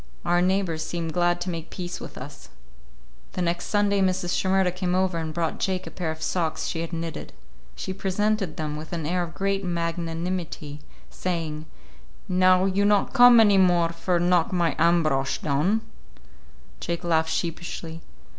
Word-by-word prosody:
Our 175 0 +3
neighbors 180 -3 0
seemed 165 -1 -4
glad 175 0 +2
to 180 - -2
make 165 -1 -6
peace 180 -1 -6
with - - -9
us. - - -10 0.8
The 180 - -3
next 170 0 -1
Sunday 205 -1 +2
Mrs. 185 -1 +1
Shimerda 190 -1 +2
came 180 0 -1
over 185 -2 +1
and 160 -1 -3
brought 165 0 -2
Jake 185 -1 -1
a - - -8
pair 175 -3 -3
of 160 0 -5
socks 165 -3 -1
she 165 - -2
had 165 - -5
knitted. 165 -1 -5 0.4
She 190 - -4
presented 195 -2 -1
them 150 -1 -3
with 155 +2 -8
an 165 -3 -3
air 180 +3 0
of 170 -1 -5
great 195 0 -1
magnanimity, 170 -2 -3 0.3
saying, 160 -4 -3 0.6
"Now 185 0 +4
you 195 +1 +1
not 205 +3 +2
come 245 -2 +8
any 205 -3 +6
more 175 -2 +4
for 170 +1 -1
knock 175 -1 +2
my 170 -3 +1
Ambrosch 155 -5 +2
down?" 155 +10 +1 1.0
Jake 170 0 -3
laughed 160 -2 +2
sheepishly. 165 0 -4
175 Hz, 165 wpm, -25 LUFS, 165-185 Hz, 1.0 s, come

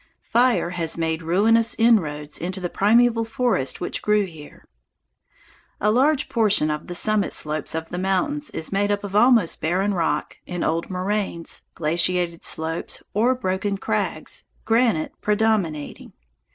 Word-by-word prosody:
Fire 240 -7 +2
has 170 -3 -1
made 160 0 -1
ruinous 220 +8 +3
inroads 155 -11 +2
into 185 +3 -4
the 175 -2 -4
primeval 230 +3 +3
forest 225 - -1
which - - -3
grew 210 -1 +2
here. 160 -5 -13 1.1
A 210 - +2
large 280 +5 +2
portion 210 -9 +3
of 150 0 -5
the 175 - -5
summit 215 +2 +1
slopes 155 0 -3
of 160 0 -4
the 180 - -4
mountains 195 +11 -1
is 160 - -4
made 200 +1 +1
up 205 0 -1
of 200 -1 -6
almost 230 -5 +4
barren 190 +5 0
rock, 170 -3 -1
in 180 -1 -3
old 165 +1 -1
moraines, 185 -2 -2
glaciated 170 +2 0
slopes, 160 +1 -2
or 240 +5 +2
broken 195 -3 -2
crags, - - -2 0.2
granite 225 -8 +2
predominating. 210 -8 -1
190 Hz, 140 wpm, -23 LUFS, 165-225 Hz, 1.1 s, almost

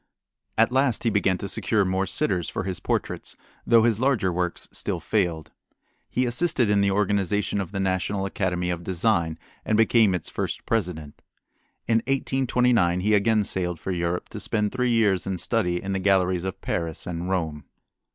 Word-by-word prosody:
At 115 +2 +4
last 130 -2 +1
he 115 - +2
began 100 -3 +2
to 100 - -5
secure 105 0 0
more 95 +1 0
sitters 90 -4 0
for - - -3
his 95 -2 -3
portraits, - - -3 0.3
though 115 -1 +6
his 115 -2 +2
larger 120 -9 +1
works 90 0 -2
still - - -3
failed. 85 -7 -1 0.6
He 125 - 0
assisted 120 -3 +1
in 100 -1 +3
the 100 - +3
organization 100 0 0
of 95 - -6
the 100 - -3
National 95 +1 -1
Academy 90 -2 -1
of 85 -1 -4
Design 85 -3 0 0.3
and 110 - +1
became 110 -3 +4
its 85 - -5
first - - -4
president. 85 -9 -3 0.7
In 115 0 +3
1829 125 -7 +1
he 105 +3 +2
again 105 +1 +3
sailed 90 -4 -2
for 95 - -4
Europe 85 0 -2
to - - -7
spend 105 -1 -1
three 125 -1 0
years 105 -6 +2
in 95 -1 -2
study 90 -3 0
in 95 +1 -4
the 95 - -1
galleries 95 -2 +2
of 95 - -5
Paris 85 -1 -3
and 90 +1 -4
Rome. 80 -6 -2
95 Hz, 175 wpm, -25 LUFS, 90-110 Hz, 0.7 s, though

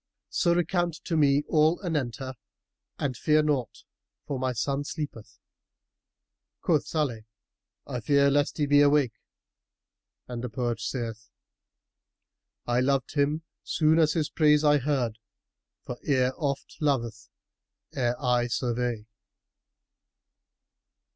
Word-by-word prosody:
So 170 -2 +2
recount 175 -1 0
to 170 - -2
me 145 -2 +4
all 155 +2 +3
anent 145 -9 -1
her 130 -1 -6 0.6
and 135 -3 -2
fear 155 +5 +3
naught, 140 -6 -1 0.4
for 140 -3 -3
my 130 0 0
son 135 +4 -1
sleepeth." 145 -8 -7 1.3
Quoth - - +2
Salih, 130 -9 -2 0.6
"I 125 - -4
fear 140 +3 +3
lest 145 +1 +1
he 150 - +1
be 145 0 +5
awake; 145 -4 +4 1.1
and 120 -1 -5
the 125 - -3
poet 120 0 -2
saith, 115 0 -4 1.4
'I 120 0 +1
loved 135 0 0
him, 150 +2 +1 0.2
soon 160 +1 +2
as 155 -2 +4
his 155 -3 -1
praise 150 -1 +4
I 150 -1 +5
heard; 125 -5 -1 0.3
* - - -62
For 125 - -6
ear 130 -3 +2
oft 140 -4 -3
loveth 120 -7 -1 0.6
ere 120 -2 -1
eye 125 -2 +1
survey. 120 -2 -2
140 Hz, 120 wpm, -27 LUFS, 120-150 Hz, 1.4 s, be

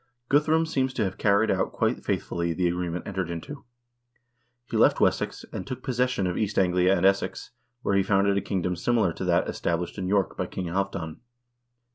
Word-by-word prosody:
Guthrum 155 +3 +3
seems 130 -4 -1
to 115 - +1
have 95 -2 -3
carried 105 +1 +3
out - - 0
quite - - 0
faithfully 85 -1 -1
the 90 +1 +1
agreement 90 0 -2
entered 95 -3 -3
into. 85 - -7 1.0
He - - -6
left - - +4
Wessex, - - 0
and - - -5
took 130 -2 -6
possession 125 -5 0
of 90 -1 -1
East 105 -1 -1
Anglia 90 0 +3
and 90 - +1
Essex, 100 0 +1 0.3
where 100 - +1
he 100 - +4
founded 100 +1 +2
a 100 - +1
kingdom 90 -2 -1
similar 105 -1 +1
to 95 - -5
that 85 -1 +2
established 85 +3 -2
in 95 - -2
York 100 0 +1
by - - -2
King 95 - -5
Halvdan. 85 -3 -3
95 Hz, 185 wpm, -26 LUFS, 90-110 Hz, 1.0 s, left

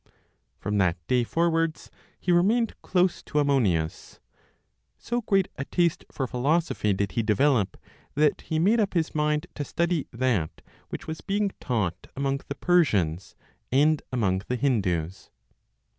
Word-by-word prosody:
From 105 +3 -1
that 90 -2 +2
day 125 +3 +2
forwards 165 +3 0 0.3
he 180 - 0
remained 210 +7 +3
close 180 -1 +1
to 150 - -5
Ammonius. 105 - 0 0.8
So 240 +1 -2
great 195 -4 +2
a 140 - -3
taste 170 0 0
for 135 - -2
philosophy 130 -2 0
did 100 0 -1
he 115 - 0
develop, 110 0 +2 0.4
that 150 0 +2
he 160 - -3
made 205 +9 +3
up 200 -3 0
his 165 -2 0
mind 150 +1 +1
to 145 - -4
study 170 +1 -1
that 115 -10 -1 0.3
which - - -6
was 160 0 -6
being 200 0 0
taught 100 -9 -2
among 140 0 -1
the 140 - -4
Persians, 100 - +1 0.4
and 150 +3 +3
among 95 -7 +1
the 125 - -1
Hindus. 95 - -1
140 Hz, 145 wpm, -26 LUFS, 105-170 Hz, 0.8 s, remained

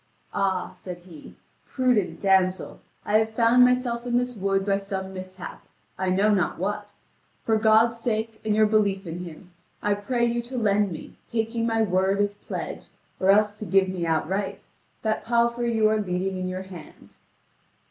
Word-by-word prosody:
"Ah," 190 -2 0
said 180 -2 -8
he, 175 -4 -13 0.3
"prudent 250 -7 0
damsel, 190 -1 +2 0.3
I 215 +1 +4
have 220 0 -2
found 235 +2 +5
myself 250 -1 +2
in 245 0 0
this 250 0 -1
wood 195 -1 0
by 200 -1 +2
some 190 -1 -5
mishap 185 -1 -8 0.3
I 190 -1 -1
know 200 +3 +3
not 180 -5 0
what. 205 +2 -3 0.5
For 225 - +3
God's 220 +2 +4
sake 225 -1 -2
and 215 -1 +1
your 215 0 +5
belief 205 -2 +1
in 170 +1 -5
Him, 180 +1 -10 0.3
I 205 - +1
pray 235 +4 0
you 235 0 0
to 245 +2 -7
lend 205 -3 +2
me, 160 - -9
taking 230 0 -1
my 225 -1 +2
word 190 0 +1
as 205 0 +1
pledge, 205 - -6 0.3
or 190 - +1
else 210 +1 +4
to 215 - -5
give 190 +1 +3
me 180 -2 -2
outright, 190 +5 -1 0.4
that 220 -1 0
palfrey 235 +1 +1
you 220 -1 +3
are 215 0 +2
leading 190 -1 -2
in 185 0 -3
your 185 +1 -4
hand." 180 -4 -13
205 Hz, 175 wpm, -25 LUFS, 190-225 Hz, 0.5 s, found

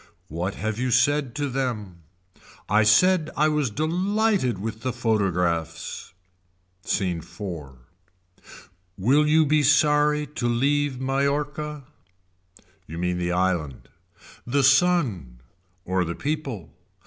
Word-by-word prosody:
What 90 +5 -3
have 110 +1 -3
you 130 0 0
said 140 +1 +2
to 145 -1 -1
them. 120 -9 -3 0.7
I 105 +2 +3
said 155 +10 +4
I 155 +2 +3
was 150 -4 0
delighted 180 - 0
with 110 +3 -5
the 130 - -2
photographs. 90 -8 -1 0.7
Scene 90 -4 -1
IV. 80 -5 -8 1.2
Will 135 +10 +3
you 155 +1 +4
be 150 +1 +3
sorry 150 +1 +3
to 125 -4 -4
leave 140 +2 +1
Mallorca. 145 +2 -2 1.0
You 80 - -8
mean 90 0 -1
the 90 0 -1
island. 90 -7 -1 0.6
The 140 +3 +1
sun. 135 - +2 0.5
Or 95 0 0
the 85 0 -4
people. 140 - -4
125 Hz, 110 wpm, -24 LUFS, 95-150 Hz, 1.2 s, said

